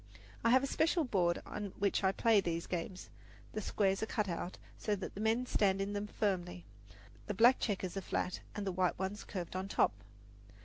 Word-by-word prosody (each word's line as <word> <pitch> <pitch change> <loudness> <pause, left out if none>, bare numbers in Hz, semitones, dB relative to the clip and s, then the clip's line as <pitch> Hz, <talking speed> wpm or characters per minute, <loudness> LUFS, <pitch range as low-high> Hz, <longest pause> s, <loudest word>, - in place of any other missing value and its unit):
I 230 - +4
have 260 +3 +6
a - - +2
special 325 +4 +2
board 180 -9 +1
on 205 -2 -5
which 200 0 +1
I 190 - +4
play 220 +1 +4
these 170 -2 -2
games. 180 +1 -4 0.4
The 215 - -2
squares 195 -1 +1
are 220 - -1
cut 210 -2 0
out, 175 0 -4 0.2
so 210 - -1
that 195 - -6
the 200 - -6
men 225 +3 +2
stand 195 -5 +2
in 200 +1 -1
them 205 0 -2
firmly. 180 -4 -2 0.6
The 205 - -2
black 240 +5 +6
checkers 195 -4 -2
are 195 - -2
flat 180 - -2 0.2
and 205 -1 -3
the 190 - 0
white 180 0 +1
ones 190 +3 -3
curved 180 -2 -5
on 190 +1 -2
top. 195 - +3
195 Hz, 205 wpm, -34 LUFS, 185-215 Hz, 0.6 s, have